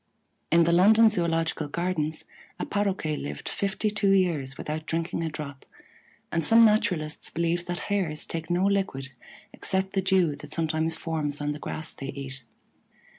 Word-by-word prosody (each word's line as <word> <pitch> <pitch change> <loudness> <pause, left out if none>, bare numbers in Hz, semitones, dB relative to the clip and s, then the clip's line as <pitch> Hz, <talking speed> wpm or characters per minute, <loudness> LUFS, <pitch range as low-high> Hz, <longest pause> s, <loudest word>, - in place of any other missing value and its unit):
In 170 +1 +6
the 170 - +2
London 215 +6 +6
Zoological 165 -5 0
Gardens 160 -1 -2 0.3
a - - -2
Paroquet 195 -7 -1
lived 70 - -6
fifty 200 +2 -1
two 205 -1 +2
years 165 -9 +1
without 155 +1 -5
drinking 165 +1 -2
a 165 - -1
drop, 145 -3 -7 0.7
and 165 -1 0
some 230 +8 +7
naturalists 180 -8 +1
believe 170 +1 -1
that 175 0 -3
Hares 180 -7 -1
take 165 -1 -5
no 175 +2 +2
liquid 190 -10 0 0.4
except 190 0 -1
the 195 - +1
dew 185 -5 +2
that - - -8
sometimes 160 0 0
forms 155 -4 -2
on 145 0 -1
the 150 - -5
grass 155 +1 -4
they 135 - -7
eat. 135 -1 -7
165 Hz, 160 wpm, -27 LUFS, 150-190 Hz, 0.7 s, some